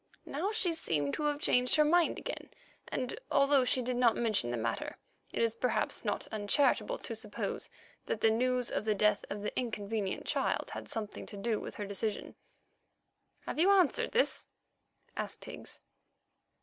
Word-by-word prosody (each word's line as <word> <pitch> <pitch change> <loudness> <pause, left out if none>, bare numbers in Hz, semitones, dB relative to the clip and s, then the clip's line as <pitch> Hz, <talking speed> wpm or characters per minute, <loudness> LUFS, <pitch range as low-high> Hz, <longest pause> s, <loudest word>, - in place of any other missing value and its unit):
Now 350 +9 -2
she 375 -6 +2
seemed 150 - 0
to 300 - -1
have 295 -1 +1
changed 250 -3 +4
her 305 -1 +5
mind 340 +2 +3
again, - - -6 0.4
and, 255 - -3
although 275 -1 +4
she 250 0 +1
did 250 0 -1
not 240 -2 +4
mention 215 - +2
the 120 - -1
matter, 115 0 -2 0.3
it - - 0
is 230 -1 +1
perhaps 250 - 0
not - - -1
uncharitable 270 - +2
to 235 - -6
suppose 215 -2 -4 0.4
that 220 - -1
the 220 0 +4
news 250 +2 +1
of - - -1
the 215 -1 +2
death 210 0 +3
of 200 0 -4
the - - -3
inconvenient 215 -4 -2
child - - 0
had - - -6
something 215 -2 -3
to 205 - -8
do 220 +1 0
with - - -7
her 205 - -4
decision. 200 +1 -3 1.1
"Have - - -5
you 360 +4 +6
answered 375 -6 +4
this?" 475 - +1 0.7
asked - - -4
Higgs. - - -8
235 Hz, 170 wpm, -32 LUFS, 210-290 Hz, 1.1 s, you